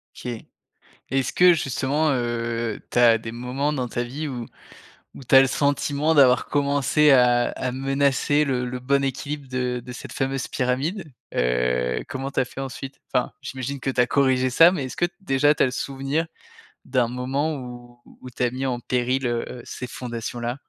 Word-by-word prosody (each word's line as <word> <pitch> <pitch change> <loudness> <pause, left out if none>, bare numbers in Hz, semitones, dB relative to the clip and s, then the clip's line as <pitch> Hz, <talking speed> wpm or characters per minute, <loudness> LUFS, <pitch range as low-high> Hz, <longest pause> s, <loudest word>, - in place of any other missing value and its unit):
OK. - - -9 0.8
Est-ce 135 -1 0
que 180 0 +6
justement, 145 +1 0
heu, 115 -3 -2
tu 120 - +1
as 115 -2 +6
des 115 0 -7
moments 130 +5 -2
dans 125 -3 -2
ta 120 +1 -2
vie 145 +6 -5
où 120 -4 -5 0.7
où 135 - -12
tu 135 - +3
as 135 - +10
le 135 - +3
sentiment 145 +3 +1
d'avoir 130 -3 +5
commencé 145 +1 +3
à 125 -2 +4
à 125 - -3
menacer 135 +2 +1
le 125 -2 -1
le 125 0 -4
bon 140 +2 +1
équilibre 140 +1 -4
de 125 -1 -2
de 125 - -9
cette 125 - -9
fameuse 135 0 -2
pyramide? 145 +7 -2 0.2
Heu, 60 0 0
comment 135 +1 -4
tu - - -1
as 130 - +2
fait 135 - -8
ensuite? 135 0 -7
Enfin, - - 0
j'imagine 130 +2 -5
que 135 - -2
tu 130 - -2
as 120 - +2
corrigé 130 0 +2
ça, 165 +7 +7
mais 145 -8 -2
est-ce 130 - -8
que - - +2
déjà 145 -5 +3
tu - - +3
as - - +5
le 125 - -1
souvenir 135 +5 -2 0.6
d'un 125 -2 +1
moment 135 +5 -2
où 120 -2 -10 0.2
où 130 - -9
tu 125 - -4
as 120 - +1
mis 130 +1 -3
en 125 -2 -1
péril, 125 +2 -1
heu, 120 +1 -3
ces 125 - -6
fondations-là? 120 0 -5
130 Hz, 190 wpm, -23 LUFS, 125-140 Hz, 0.8 s, as